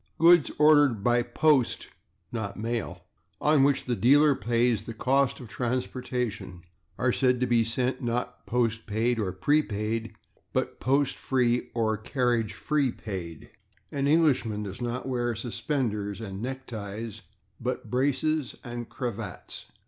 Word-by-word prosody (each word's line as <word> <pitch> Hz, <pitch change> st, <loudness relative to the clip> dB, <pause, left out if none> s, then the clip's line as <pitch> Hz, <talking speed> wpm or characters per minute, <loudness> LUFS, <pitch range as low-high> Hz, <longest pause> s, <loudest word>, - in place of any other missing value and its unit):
Goods 170 Hz, -1 st, +6 dB
ordered 145 Hz, -8 st, +5 dB
by 120 Hz, +1 st, +3 dB
/post/ 130 Hz, +2 st, +2 dB, 0.5 s
(not 110 Hz, -4 st, -4 dB
mail) 110 Hz, -6 st, -3 dB, 0.4 s
on 150 Hz, -2 st, +4 dB
which 140 Hz, -1 st, +2 dB
the 125 Hz, -, 0 dB
dealer 145 Hz, +5 st, +5 dB
pays 120 Hz, 0 st, +1 dB
the 115 Hz, -, -7 dB
cost 135 Hz, +3 st, +1 dB
of 125 Hz, -, -9 dB
transportation 125 Hz, -6 st, -3 dB, 0.3 s
are 125 Hz, -1 st, +1 dB
said 125 Hz, -2 st, +2 dB
to 125 Hz, -, +2 dB
be 120 Hz, -2 st, +3 dB
sent, 125 Hz, +3 st, -1 dB
not 125 Hz, +1 st, -3 dB
/postpaid/ 115 Hz, 0 st, 0 dB
or 100 Hz, -4 st, -1 dB
/prepaid/, 110 Hz, -1 st, 0 dB, 0.4 s
but -, -, -1 dB
/post 135 Hz, +1 st, +1 dB
free/ 125 Hz, -2 st, +1 dB
or 110 Hz, -2 st, +1 dB
/carriage 120 Hz, -2 st, 0 dB, 0.4 s
paid/. 85 Hz, -6 st, -7 dB, 0.4 s
[Pg104] -, -, -6 dB
An 140 Hz, -, +1 dB
Englishman 135 Hz, -9 st, +2 dB
does 100 Hz, +3 st, -7 dB
not 120 Hz, +2 st, -3 dB
wear 120 Hz, -2 st, -1 dB
/suspenders/ 110 Hz, -3 st, -2 dB
and 100 Hz, -2 st, -6 dB
/neckties/, 110 Hz, -4 st, -6 dB, 0.4 s
but -, -, -4 dB
/braces/ 140 Hz, +2 st, 0 dB
and 120 Hz, -1 st, -6 dB
/cravats 115 Hz, -5 st, -6 dB
120 Hz, 130 wpm, -27 LUFS, 110-130 Hz, 0.5 s, Goods